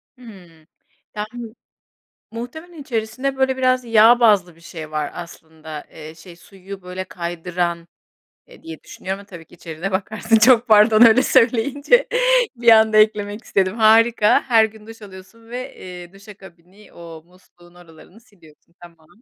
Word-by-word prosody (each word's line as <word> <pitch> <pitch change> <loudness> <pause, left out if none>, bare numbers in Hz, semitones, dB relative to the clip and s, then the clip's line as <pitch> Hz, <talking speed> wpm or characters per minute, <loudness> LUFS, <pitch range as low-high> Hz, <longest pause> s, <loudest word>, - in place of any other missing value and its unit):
Hıı, 180 -10 -17 0.5
yani, 220 +2 -8 0.8
muhtemelen 305 +8 -10
içerisinde, 255 +2 -4
böyle, 265 0 0
biraz 255 -1 0
yağ 230 +2 +5
bazlı 195 -7 +2
bir 165 - -23
şey 160 -2 -10
var 150 -1 -3
aslında. 160 -3 -11
Eee, 155 0 -12
şey, 170 +1 -15
suyu, 195 +2 -13
böyle, 180 +1 -7
kaydıran, 170 -1 -5 0.6
eee, - - -19
diye 160 -1 -10
düşünüyorum 190 +1 -7
ama 200 - -15
tabii 170 -5 -13
ki - - -20
içeriğine 170 +3 -7
bakarsın. 215 +3 -1
Çok 240 +1 +4
pardon, 215 +1 +4
öyle 235 +2 +6
söyleyince 275 - +1 0.5
bir 235 0 +2
anda 220 -1 +4
eklemek 210 0 +1
istedim. 190 0 -1
Harika, 225 0 +3
her 225 -4 +3
gün 220 0 -13
duş 225 0 -13
alıyorsun 205 +4 -15
ve, 250 +1 -8
eee, 180 0 -12
duşa 200 +1 -15
kabini, 190 +2 -19
o 165 -2 -13
musluğun 175 -1 -24
oralarını 175 +4 -18
siliyorsun, 170 -7 -24
tamam. 165 -2 -17
205 Hz, 145 wpm, -19 LUFS, 175-230 Hz, 0.8 s, öyle